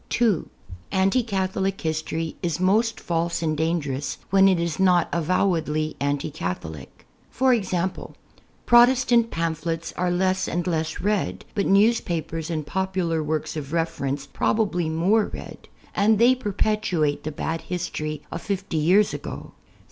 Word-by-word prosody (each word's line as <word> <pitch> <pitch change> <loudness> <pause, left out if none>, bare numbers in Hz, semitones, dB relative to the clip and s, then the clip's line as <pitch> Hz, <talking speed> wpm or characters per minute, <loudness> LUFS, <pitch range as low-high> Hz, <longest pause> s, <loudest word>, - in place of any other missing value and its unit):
(2) 225 -8 +1 0.4
Anti 195 +6 +3
Catholic 195 -3 -1
history 160 0 -2
is 170 -2 -1
most 215 +5 +2
false 170 0 -1
and 155 -1 0
dangerous 145 -4 -1
when 195 0 +6
it 185 -3 +3
is 170 -1 -2
not 180 -2 +4
avowedly 160 -3 0
anti 145 +2 -1
Catholic. 80 - -6 0.5
e.g. 195 -6 0 0.9
Protestant 240 -1 +5
pam])hlets 165 -1 -3
are 180 0 0
less 185 +1 +1
and 175 +1 -2
less 160 -3 -2
read, 185 - -1
])ul 200 - +1
newspapers 175 -6 +1
and 155 -3 -2
popular 185 -1 -1
works 155 +1 -2
of 150 -1 -6
reference 145 -4 -1
i)robably 180 -5 0
more 190 +7 +2
read; - - -10 0.2
and 215 +2 +3
they 240 +4 +6
])erpetuate 205 - 0
the 155 - -4
bad 160 +2 -3
history 155 -4 -4
of 165 - -5
fifty 195 -4 -3
years 185 +7 +4
ag^. - - -7
170 Hz, 135 wpm, -24 LUFS, 155-195 Hz, 0.9 s, when